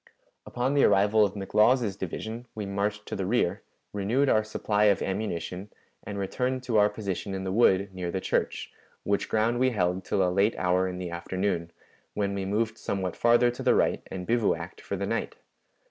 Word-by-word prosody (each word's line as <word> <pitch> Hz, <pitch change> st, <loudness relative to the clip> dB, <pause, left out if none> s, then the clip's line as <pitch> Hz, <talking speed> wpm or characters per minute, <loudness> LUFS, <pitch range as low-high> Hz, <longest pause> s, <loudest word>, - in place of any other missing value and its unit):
Upon 125 Hz, +3 st, -1 dB
the 145 Hz, -, +4 dB
arrival 105 Hz, +2 st, +4 dB
of 100 Hz, -1 st, 0 dB
McLaws's 105 Hz, +2 st, +2 dB
division 110 Hz, +6 st, -6 dB
we 105 Hz, -2 st, -4 dB
marched 100 Hz, +1 st, -2 dB
to -, -, -5 dB
the 95 Hz, -2 st, -2 dB
rear, 110 Hz, -5 st, +1 dB, 0.3 s
renewed 115 Hz, +8 st, +1 dB
our 110 Hz, -, +3 dB
supply 105 Hz, -1 st, 0 dB
of 100 Hz, -2 st, +3 dB
ammunition, 95 Hz, -1 st, -3 dB, 0.3 s
and 100 Hz, -, -6 dB
returned 125 Hz, +6 st, -2 dB
to 115 Hz, -4 st, +2 dB
our 105 Hz, 0 st, +5 dB
position 100 Hz, -2 st, -4 dB
in 95 Hz, -, -4 dB
the 95 Hz, -, -2 dB
wood 95 Hz, -3 st, +3 dB
near 90 Hz, -2 st, -4 dB
the 95 Hz, -, -2 dB
church, -, -, -2 dB, 0.3 s
which 100 Hz, 0 st, 0 dB
ground 115 Hz, +2 st, +1 dB
we 130 Hz, 0 st, +4 dB
held 90 Hz, -4 st, 0 dB
till 95 Hz, -1 st, +1 dB
a 90 Hz, -, -1 dB
late 100 Hz, +4 st, +2 dB
hour 90 Hz, +1 st, +2 dB
in 90 Hz, -1 st, -5 dB
the 90 Hz, -1 st, -5 dB
afternoon, 85 Hz, 0 st, -2 dB, 0.5 s
when 100 Hz, -1 st, -1 dB
we 100 Hz, -1 st, -3 dB
moved 110 Hz, +3 st, -1 dB
somewhat 95 Hz, -2 st, -3 dB
farther 120 Hz, +1 st, +4 dB
to 120 Hz, -, -8 dB
the -, -, +3 dB
right -, -, +2 dB
and 90 Hz, -1 st, -5 dB
bivouacked 115 Hz, 0 st, -1 dB
for -, -, -4 dB
the -, -, -2 dB
night. -, -, -2 dB
100 Hz, 190 wpm, -27 LUFS, 95-110 Hz, 0.5 s, our